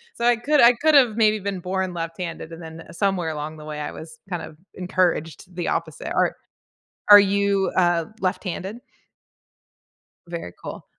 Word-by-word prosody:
So 235 - -2
I 240 0 +5
could 290 +5 +2
I 240 +1 +8
could've 260 -4 +4
maybe 215 -1 +3
been 195 -1 -4
born 185 0 -2
left-handed, 165 0 -5
and 165 - -9
then, 160 0 -9
eh, - - -12
somewhere 180 -2 0
along 155 0 -5
the 150 - -11
way, 150 -1 -6
I 150 - -4
was 160 -1 -11
kind 175 -2 -3
of 150 - -11 0.2
encouraged 180 -1 -1
the 175 - -3
opposite. 160 -3 -3
Are - - +1 0.8
are 205 0 +12
you, 200 0 +1
uh 175 -2 +2
left-handed? 185 +3 -3 1.5
Very 170 - -6
cool. - - -8
180 Hz, 165 wpm, -23 LUFS, 165-200 Hz, 1.5 s, are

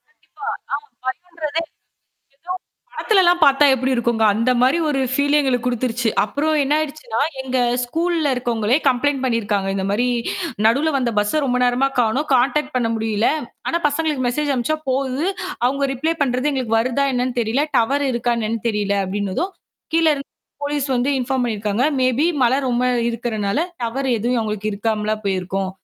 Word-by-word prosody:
கண்டிப்பா. 420 -2 -15 0.4
ஆ - - -34 0.2
பயன்றதே 325 +1 -3
இல்ல. - - -20 0.7
எதோ 345 +6 -6 0.4
படத்துலலாம் 355 -5 +3
பாத்தா 280 +1 +5
எப்படி 260 +1 0
இருக்கும்ங்க. 235 -2 +1
அந்த 230 +4 +1
மாதிரி 265 +7 +4
ஒரு 275 -2 0
ஃபீல் 285 +2 +2
எங்களுக்குக் 250 -3 0
குடுத்துருச்சு. 240 -1 -1
அப்புறம் 300 +8 -1
என்ன 280 +2 +1
ஆயிடுச்சுனா, 290 -7 -3 0.2
எங்க 260 -1 -1 0.3
ஸ்கூல்ல 325 +2 0
இருக்கொங்களே 240 0 +1
கம்ப்ளெயின்ட் 270 +1 +1
பண்ணிருக்காங்க. 210 -5 0
இந்த 190 - -2
மாரி 240 +5 +1 0.6
நடுவுல 280 +8 +3
வந்த 245 -3 0
பஸ்ஸ 210 +9 +1
ரொம்ப 250 0 +1
நேரமா 250 +2 +2
காணோம். 245 +7 0
கான்டாக்ட் 255 +4 +1
பண்ண 230 -2 +1
முடியல. 220 0 +1 0.4
ஆனா 340 - 0
பசங்களுக்கு 295 -4 -1
மெசேஜ் 290 +3 0
அனுப்பிச்சா 260 +6 -1
போகுது. 270 +4 -1 0.4
அவங்க 275 +2 +1
ரிப்ளை 320 +6 0
பண்றது 255 +2 +1
எங்களுக்கு 240 -5 0
வருதா 255 +4 0
என்னன்னு 250 0 -1
தெரியல. 235 +6 +1
டவர் 280 +5 +1
இருக்கா 240 0 0
என்னன்னு 225 0 -2
தெரியல 205 -2 0
அப்படின்னதும், 200 - -2 0.4
கீழ 330 0 +3
இருந்து 275 0 -8 0.3
போலிஸ் 285 -1 -1
வந்து 250 +3 +1
இன்ஃபார்ம் 255 0 0
பண்ணிருக்காங்க. 215 0 -1 0.2
மேபீ 255 +4 +2 0.2
மழை 250 +2 +3
ரொம்ப 245 +1 +1 0.3
இருக்குறனால 225 -1 -2 0.3
டவர் 265 +4 -2
எதுவும் 240 +3 0
அவுங்களுக்கு 215 -1 -2
இருக்காமலா 215 0 -1
போயிருக்கும், 190 0 -1
250 Hz, 155 wpm, -20 LUFS, 225-285 Hz, 0.7 s, பாத்தா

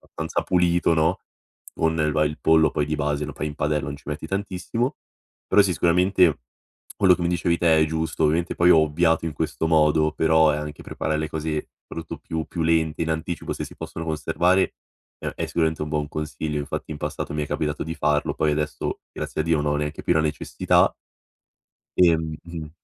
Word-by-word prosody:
abbastanza 80 +1 -2
pulito, 85 -2 +2
no, 80 +3 +2 0.5
con 80 -1 +1
va 75 0 +3
il 75 0 -3
pollo 80 0 +4
poi 75 - 0
di 75 0 -2
base 75 -1 -1
lo 75 - -7
fai 75 - -3
in 75 - -7
padella 75 -2 0
non 70 - -4
ci - - -20
metti 75 +1 -4
tantissimo. 100 - -2 0.5
Però, 105 - +6
sì 95 -2 +1
sicuramente 90 -3 +3 0.6
quello 95 -3 +6
che 90 - -7
mi 85 - +1
dicevi 85 -1 +1
te 80 -2 +4
è - - +4
giusto. 80 0 -2
Ovviamente 80 +3 +1
poi 85 +1 +4
ho 80 - +7
ovviato 80 +2 +2
in 80 - -3
questo 80 +1 -2
modo, 75 -1 +3
però 80 -1 +4
è - - 0
anche 75 -1 -6
preparare 80 -1 -2
le 80 -1 -3
cose 80 -1 -3 0.2
rutto 80 -1 -6
più 80 0 -4
più 85 - -5
lente, 80 -1 +1
in 80 - -4
anticipo, 80 +1 -4
se - - -5
si - - -12
possono 80 - -6
conservare, 80 +4 +1 0.5
uhm, - - -1
è - - -2
sicuramente 80 -2 0
un 75 - -6
buon 75 -1 -1
consiglio; 75 0 -3
infatti, 75 +2 -5
in 75 - -5
passato - - -4
mi 75 -1 -1
è - - -6
capitato 75 -1 -2
di 80 +2 -5
farlo 75 -1 +1
poi 75 - +1
adesso, 75 0 -2
grazie - - -3
a - - -3
Dio, 80 -3 +2
non 75 0 0
ho - - 0
neanche 75 +1 -4
più - - +2
la 80 - +3
necessità 75 -1 +1 1.1
ehm 80 -2 +1
80 Hz, 200 wpm, -24 LUFS, 75-85 Hz, 1.1 s, ho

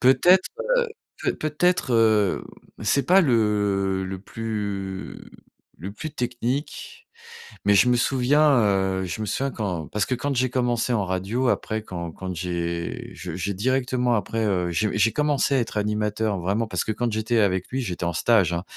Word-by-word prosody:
Peut-être, 175 +8 +5 0.3
heu, 480 - +2 0.4
peut - - +1
peut-être, 155 -2 0
hem, 110 -4 +3 0.4
c'est 140 +4 +2
pas 190 +2 +6
le 105 - +1
le 95 0 -5
plus 100 -3 -5 0.6
le 95 +5 -6
plus 155 +8 -6
technique 125 +3 -3 0.7
mais 100 - +4
je 115 +5 +5
me 125 - +4
souviens, 135 +4 +3
heu, 95 -2 +1
je 90 +5 -4
me - - -2
souviens 135 +7 -1
quand 90 -8 -3
parce 105 -1 -1
que 130 - -2
quand 140 +2 -2
j'ai 130 0 +1
commencé 125 -1 0
en 105 -5 +1
radio 95 +8 -1
après, 110 -2 -1
quand 85 -4 -6
quand 95 0 -6
j'ai 85 -1 -3
je 90 -2 -7
j'ai 100 +2 -2
directement 125 +2 +1
après, 110 +2 -1
heu, 90 -3 0
j'ai 105 +5 0
j'ai 115 +1 +3
commencé 145 -2 +1
à - - +3
être 115 -2 -3
animateur, 105 0 -1
vraiment, 100 +6 -1
parce 90 -5 -2
que 110 - -2
quand 120 +2 -1
j'étais 110 +2 0
avec 95 -3 +1
lui, 130 - -2
j'étais 90 -6 -4
en 85 - 0
stage, 105 -7 +3
hein, 85 +1 -2
110 Hz, 175 wpm, -24 LUFS, 95-125 Hz, 0.7 s, pas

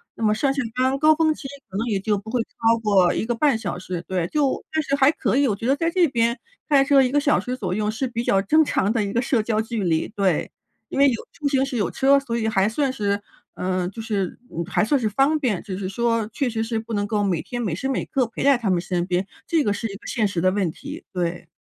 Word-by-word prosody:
那 - - -5
么 215 -1 +4
上 270 +5 +1
下 280 - -1
班 260 +1 +1
高 310 +2 +5
峰 315 0 +2
期 300 - -12 0.2
可 190 - -5
能 225 - -1
也 205 -4 0
就 210 +1 0
不 220 +3 -8
会 250 - +1
超 230 0 +1
过 195 -5 +4
1 - - -1
个 240 +1 -1
半 275 0 +2
小 200 -6 -4
时。 180 -1 -5
对， 185 -3 -1
就， 285 +4 0
但 315 0 +1
是 275 - 0
还 280 0 +5
可 320 - -1
以， 280 +1 +4
我 210 - +1
觉 230 - -4
得 270 - +4
在 330 +3 0
这 345 0 +3
边 235 -2 0 0.3
开 275 -2 +5
车 275 -1 +5
1 250 - 0
个 290 - +3
小 290 0 +3
时 250 +1 -3
左 190 -7 -3
右 210 0 0
是 240 +5 -2
比 235 -1 -3
较 195 -4 +2
正 310 +11 +4
常 210 -7 0
的 220 -3 +1
一 200 - -3
个 235 +3 +1
社 240 -4 +1
交 215 -1 0
距 225 -1 -3
离， 165 -3 +1
对。 190 -6 0 0.4
因 - - -5
为 280 0 +6
有 240 - 0 0.2
出 295 -3 -2
行 270 -1 +2
时 270 - -5
有 205 -6 0
车， 275 +1 +4
所 240 -4 -2
以 220 - -1
还 195 -2 +2
算 265 +3 0
是， 200 -3 -1 0.3
嗯， 185 0 -2
就 225 - -7
是 205 -5 -2
嗯， 170 - -4
还 200 - +1
算 285 +6 +2
是 220 -3 0
方 275 +8 +2
便。 240 - -1
就 190 -2 -6
是 190 -1 -4
说， 230 +2 0
确 275 0 -1
实 225 -1 -2
是 225 0 -2
不 225 +1 -7
能 205 -1 0
够 205 0 0
每 180 -5 0
天 240 -1 -5
每 195 -9 -1
时 265 +10 -3
每 265 - -1
刻 265 -3 0
陪 230 - -7
在 280 -1 +5
他 230 -4 -2
们 180 -2 +2
身 175 0 -2
边， 180 +1 -1 0.2
这 325 -5 +1
个 205 - +2
是 225 +2 -3
一 - - -7
个 - - -13
现 225 -4 0
实 195 -4 -1
的 185 +2 +3
问 190 -4 0
题， - - -9
对。 175 -2 -3
225 Hz, 295 characters per minute, -23 LUFS, 195-270 Hz, 0.4 s, 为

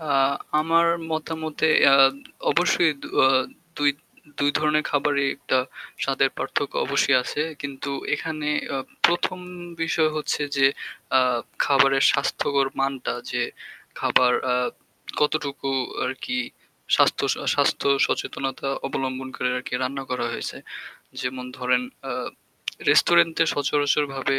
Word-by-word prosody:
অ্যাঁ 140 -3 +2 0.3
আমার 165 +2 +3 0.2
মতামতে 160 0 -2
অ্যাঁ 135 -1 +7 0.4
অবশ্যই 175 -2 +3 0.3
অ্যাঁ 130 0 +5 0.4
দুই 145 -1 +4 0.5
২ 145 0 +3
ধরনের 150 0 +1
খাবারেই 145 -1 +1
একটা 130 -1 0 0.4
স্বাদের 135 0 +2
পার্থক্য 140 +1 -2
অবশ্যই 140 0 +3
আছে 145 +4 -2 0.2
কিন্তু 140 0 -5 0.2
এখানে 155 -1 -4 0.2
অ্যাঁ 135 -1 -3 0.2
১ম 175 +1 0 0.4
বিষয় 165 -1 +2
হচ্ছে 150 -1 -1
যে 135 0 +5 0.5
অ্যাঁ 125 -2 +3 0.3
খাবারের 135 -1 +4
স্বাস্থ্যকর 140 0 0
মানটা 135 -2 -1 0.2
যে - - 0 0.6
খাবার 125 -1 +4
অ্যাঁ 125 0 +1 0.5
কতটুকু 145 -2 -1 0.3
আর 125 - -1
কি 125 - -2 0.6
স্বাস্থ্য - - +3 0.2
আ - - -7
স্বাস্থ্য - - +1 0.2
সচেতনতা 135 0 -3 0.2
অবলম্বন 130 -1 -3
করে 125 - -1
আর - - -7
কি - - -5
রান্না 135 +1 -3
করা 125 -2 -1
হয়েছে? - - -5 0.6
যেমন 125 0 -4
ধরেন 125 - +1 0.2
অ্যাঁ - - -4 0.6
রেস্টুরেন্টে 165 -1 +4
সচরাচরভাবে 140 -1 0
140 Hz, 120 wpm, -24 LUFS, 135-150 Hz, 0.6 s, অ্যাঁ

